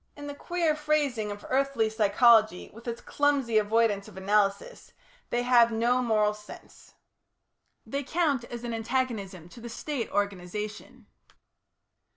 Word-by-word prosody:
In 290 - -9
the 290 - -5
queer 335 +1 -1
phrasing 295 -8 0
of 205 0 -8
earthly 270 -4 +1
psychology 220 -1 +3
with 230 +3 -13
its 235 0 -4
clumsy 275 -6 +1
avoidance 215 -1 +1
of 200 -3 -13
analysis, 205 - -1 0.4
they 240 0 0
have 240 -2 +5
no 240 +3 +1
"moral 215 -3 +2
sense." 210 0 -14 0.9
They 280 0 -3
count 290 -3 0
as 240 0 -8
an 240 -1 -4
antagonism 225 -7 -3
to 235 - -13
the 235 - -7
State 265 0 -4
organisation. 205 +1 -4
230 Hz, 135 wpm, -27 LUFS, 210-265 Hz, 0.9 s, have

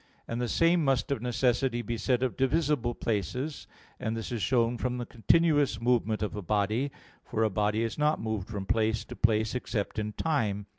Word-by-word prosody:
1. - - -6
And 120 - -2
the 120 - 0
same 165 +5 +3
must 135 -1 +1
of 140 - -1
necessity 125 0 +1
be 115 +2 -3
said 125 +3 +1
of 130 - -1
divisible 135 -3 +1
places: 120 - -3 0.3
and 110 +1 -2
this 115 - -5
is 115 -3 -2
shown 120 0 +2
from 125 -1 -1
the 120 - -3
continuous 145 +1 +2
movement 115 -2 +1
of 105 - -3
a 105 - -4
body. 105 +7 0 0.3
For 110 - -1
a 110 - +2
body 105 +3 +1
is 115 +4 -3
not 150 +1 +2
moved 110 -4 -3
from 100 -3 -5
place 110 +1 +1
to - - -9
place 110 -1 +2
except 110 -4 -2
in 105 0 -3
time. 110 -11 -1
115 Hz, 200 wpm, -29 LUFS, 110-130 Hz, 0.3 s, same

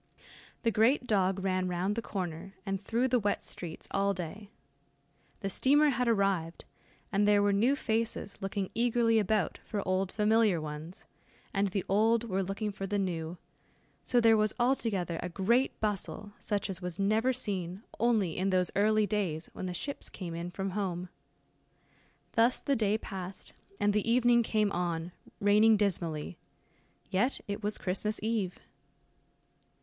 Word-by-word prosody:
The 230 - +3
great 240 +5 +3
dog 195 -4 +1
ran 185 -1 0
round 180 +3 -1
the 230 - -1
corner, 185 -2 -5
and 195 -1 -2
through 230 +5 +1
the 250 0 +3
wet 205 -1 -1
streets 165 -3 -6
all 200 0 +1
day. 185 +4 -6 0.9
The 195 - -2
steamer 290 +8 +4
had 250 -2 0
arrived, 195 -7 0 0.5
and 205 +1 +2
there 205 -1 +5
were 205 0 +3
new 235 +8 +3
faces 225 -5 -2
looking 195 0 -3
eagerly 230 -1 +3
about 210 -3 0
for 205 -3 -4
old 185 0 +1
familiar 215 -3 +3
ones, 155 +3 -7 0.5
and 200 0 +2
the 195 0 -2
old 220 +3 +3
were 195 -4 -1
looking 195 +3 -2
for 195 -1 -5
the 205 +1 -1
new; 175 -3 -2 0.7
so 245 - +2
there 225 -1 +6
was 215 0 +1
altogether 215 -9 0
a 180 - -3
great 235 +9 +1
bustle 210 0 -2
such 205 -1 -1
as 190 -2 -4
was 180 -1 -4
never 215 +5 +2
seen, 195 -5 -3 0.2
only 215 -7 +2
in 190 +2 0
those 185 -1 +2
early 215 +1 +3
days 185 -6 -2
when 185 - -5
the - - -3
ships 280 +10 -5
came 175 -4 -6
in 170 +1 -4
from 190 +2 -4
home. 180 -3 -3 1.2
Thus 230 +2 +3
the 280 - 0
day 215 -2 +2
passed, 190 -3 -7 0.3
and 205 0 +2
the 210 +2 0
evening 240 0 +5
came 215 -2 +1
on, 175 -1 -2 0.3
raining 210 +2 +5
dismally 170 -5 -1 0.7
yet 230 +9 +1
it 200 +1 -4
was 210 0 -2
Christmas 205 +3 -1
eve. 215 -5 -1
200 Hz, 155 wpm, -31 LUFS, 185-220 Hz, 1.2 s, there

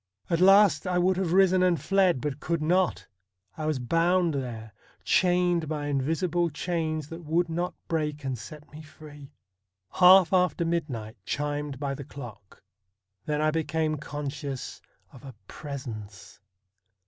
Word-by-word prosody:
At 170 +1 +1
last 195 0 +5
I 180 -1 0
would 185 +1 +2
have 185 -3 -1
risen 185 0 +4
and 180 -3 +2
fled, 180 -2 +2
but 145 -1 -3
could 170 +2 -2
not. 180 +3 +1 0.5
I 155 -1 -4
was 155 -3 0
bound 165 +6 +1
there 115 -5 -5 0.2
— - - -35
chained 175 -3 +2
by 150 -2 -3
invisible 165 +5 0
chains 155 -1 -3
that 165 +1 -8
would 165 +2 0
not 175 +2 -3
break 150 -3 -2
and 135 -1 -2
set 145 +6 -11
me 150 +1 -10
free. 150 -2 -13 0.6
Half 185 -1 +6
after 180 -2 +2
midnight 135 -10 -3
chimed 145 +1 -3
by 140 -1 -2
the 140 - -7
clock. 120 -8 -12 0.6
Then 150 0 0
I 155 0 +2
became 155 0 -1
conscious 145 -2 -6 0.3
of 130 - -14
a 135 -4 -10
presence. 110 - -8
155 Hz, 150 wpm, -27 LUFS, 140-175 Hz, 0.6 s, Half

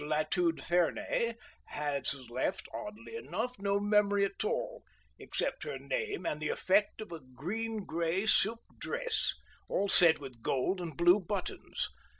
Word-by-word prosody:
Latude 155 +3 +1
Fernay 180 +6 +1 0.3
has 145 -2 -1 0.2
left, 130 +9 -1
oddly 220 - -7
enough, 250 - -3
no 200 0 +1
memory 205 -1 +3
at 195 +1 -3
all - - -2 0.4
except - - -2
her - - -4
name 445 -5 -3
and 150 - -2
the 155 - -1
effect 200 +3 +2
of 215 - -8
a 165 - -5
green 195 - -4
grey 170 +4 0
silk 225 +1 +4 0.2
dress, 485 -4 0 0.3
all 200 - +1
set 175 -4 +7
with 130 -5 -10
gold 140 +11 0
and 165 -5 -6
blue 175 +3 +6
buttons. 190 0 -3
195 Hz, 145 wpm, -32 LUFS, 160-215 Hz, 0.4 s, set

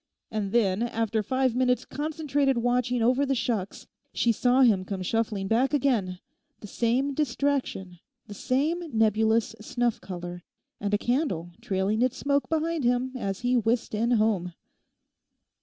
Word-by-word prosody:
And 210 -3 -2
then, 200 -3 +2
after 225 -2 0
five 260 +3 0
minutes' 250 0 +1
concentrated 290 -3 -1
watching 245 0 +1
over 255 +4 +3
the 275 -1 +1
shucks, 220 -6 -2 0.3
she 235 - +2
saw 245 +4 +3
him 205 -7 +4
come 190 -1 -4
shuffling 210 -1 -1
back 255 +7 +2
again—the 260 - -3
same 245 +7 0
distraction, 265 - -1 0.3
the 205 - -9
same 285 - 0 0.2
nebulous 220 +1 +2
snuff 240 +1 -1
colour, 175 -1 -7 0.4
and 205 -1 -2
a 205 - +3
candle 215 - -1
trailing 195 +3 0
its 255 +1 +1
smoke 280 0 0
behind 325 -1 -1
him 245 +1 +1
as 195 -5 -3
he 245 +1 +1
whisked 230 0 0
in 225 +3 0
home. 210 -6 +1
235 Hz, 140 wpm, -27 LUFS, 205-260 Hz, 0.4 s, him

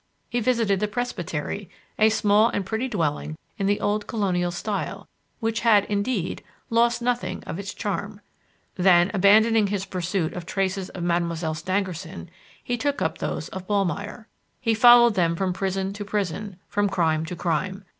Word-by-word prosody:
He 240 - +1
visited 230 -5 +1
the 210 - 0
"presbytery" 205 -5 -4 0.3
a 220 0 +6
small 215 +1 +4
and 200 - -2
pretty 220 +6 -2
dwelling 155 - -2 0.2
in 195 - +1
the 205 0 +2
old 210 0 -1
colonial 185 -6 0
style 200 +4 -4 0.3
which 225 -1 -1
had, 215 -4 +5
indeed, 200 -2 -2 0.3
"lost 235 +1 +2
nothing 245 0 -1
of 165 - -6
its 200 -1 -5
charm." 205 0 -4 0.6
Then, 180 0 +5
abandoning 215 +2 +5
his 200 -1 -2
pursuit 180 -2 -2
of 175 -1 -7
traces 190 -1 -1
of 180 - -6
Mademoiselle 170 -2 0
Stangerson, 185 +1 -4 0.3
he 245 - -2
took 285 +3 -1
up - - -1
those - - -3
of 190 -1 -8
Ballmeyer. 200 +2 -1 0.3
He 225 -1 +1
followed 240 +1 +7
them 170 -4 +1
from 185 +1 -1
prison 190 +1 -2
to 205 +1 -6
prison, 200 -1 -3
from 205 0 0
crime 160 -4 +1
to 180 - -5
crime. 185 +4 -2
200 Hz, 160 wpm, -24 LUFS, 180-215 Hz, 0.6 s, followed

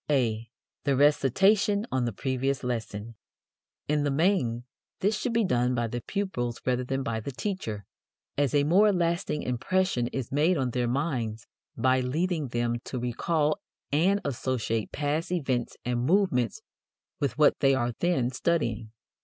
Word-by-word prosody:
(a) 115 -5 +1 0.3
The 140 -2 +2
Recitation 195 - +3
on 130 -2 +1
the 120 - -1
Previous 135 +4 -1
Lesson. 115 -2 -4 0.7
In 150 0 +1
the 145 - +1
main, 135 - +1 0.4
this 205 +3 +2
should 240 +3 -2
be 230 -2 +2
done 125 -4 +1
by 120 -1 0
the 120 +1 -4
pupils 120 - -3
rather 125 0 +1
than 135 +2 -2
by 115 -4 -2
the 125 +6 -5
teacher, 125 - -4 0.5
as 145 -1 +1
a 145 - +4
more 195 +8 +5
lasting 170 -3 0
impression 125 +1 0
is 130 -1 -4
made 155 +6 +3
on 130 -3 0
their 125 0 0
minds 120 -5 -2 0.3
by 130 +2 +3
leading 155 +4 -1
them 120 -1 -1
to 130 - -4
recall 150 +6 0 0.3
and 180 +8 +3
associate 120 -4 -2
past 150 +4 -1
events 130 -9 -1
and 120 0 0
movements 190 - +2 0.6
with 140 -4 -1
what 150 -1 +4
they 135 -1 +4
are 120 -2 0
then 165 -9 +1
studying. 120 -7 -1
135 Hz, 155 wpm, -28 LUFS, 120-170 Hz, 0.7 s, more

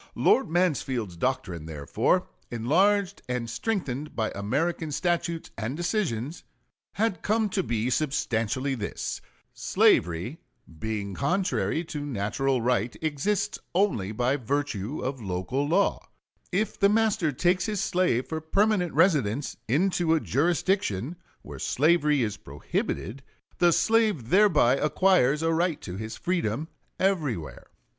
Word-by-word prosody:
Lord 265 - +3
Mansfield's 135 - 0
doctrine, 85 -7 -2
therefore, 75 -3 0 0.2
enlarged 185 - +2
and 125 -2 -2
strengthened 150 - -3
by 110 -1 -1
American 150 - -1
statutes 170 +1 -1
and 115 +6 -3
decisions, 165 - -2 0.5
had 205 -5 0
come 215 0 +1
to 195 0 0
be 115 -7 -1
substantially 130 -2 0
this: 110 -5 -4 0.3
Slavery, 85 - +2 0.4
being 105 -1 -3
contrary 170 - 0
to 155 -3 -5
natural 130 +1 -1
right, 120 -2 0
exists 180 +8 -1 0.2
only 145 - +1
by 125 +5 +1
virtue 135 -2 -2
of 130 -1 -3
local 95 +9 -2
law; 190 +6 +2 0.5
if 205 +4 -1
the 200 - +5
master 210 -7 +2
takes 180 +6 +1
his 210 -2 -2
slave 180 -10 +1
for 160 -1 -4
permanent 195 +1 +1
residence 140 - +2
into 165 - +2
a - - +2
jurisdiction 160 - 0 0.3
where - - -9
slavery 150 -2 +2
is 105 -2 -2
prohibited, 95 - -4 0.4
the 175 -1 +5
slave 215 - +2
thereby 175 - +5
acquires 150 -3 +3
a 165 0 +2
right 170 -1 +1
to 90 - -7
his 110 +3 -6
freedom 160 -5 -1 0.3
everywhere. 150 - -1
150 Hz, 120 wpm, -27 LUFS, 115-180 Hz, 0.5 s, the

